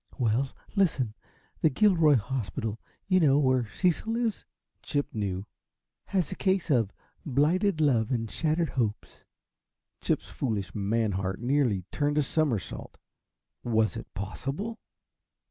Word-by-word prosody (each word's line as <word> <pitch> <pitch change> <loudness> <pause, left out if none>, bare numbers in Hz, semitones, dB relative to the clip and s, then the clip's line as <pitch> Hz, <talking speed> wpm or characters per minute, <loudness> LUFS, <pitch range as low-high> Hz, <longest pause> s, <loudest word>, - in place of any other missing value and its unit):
"Well, 125 +1 +1 0.3
listen. 145 - +2 0.5
The 160 - +5
Gilroy 165 -3 +5
hospital 115 -2 -2 0.3
you 185 -1 +4
know, 145 -5 +5
where 130 -5 +2
Cecil 195 +5 +1
is" 230 -4 -1 0.4
Chip 145 -1 -2
knew 100 -3 -2 0.6
"has 185 -4 0
a - - -3
case 190 -4 +1
of 115 -7 +3 0.3
blighted 160 +6 +2
love 130 -7 +3
and 115 -3 0
shattered 160 +6 0
hopes" 110 -5 -3 0.8
Chip's - - 0
foolish, 100 -9 -2
man 110 +2 0
heart 95 0 -2
nearly 120 -6 +1
turned 145 0 0
a 150 - +4
somersault. 135 - -1 0.7
Was 110 -2 +2
it 115 - -7
possible? 135 - -4
135 Hz, 125 wpm, -28 LUFS, 110-160 Hz, 0.8 s, The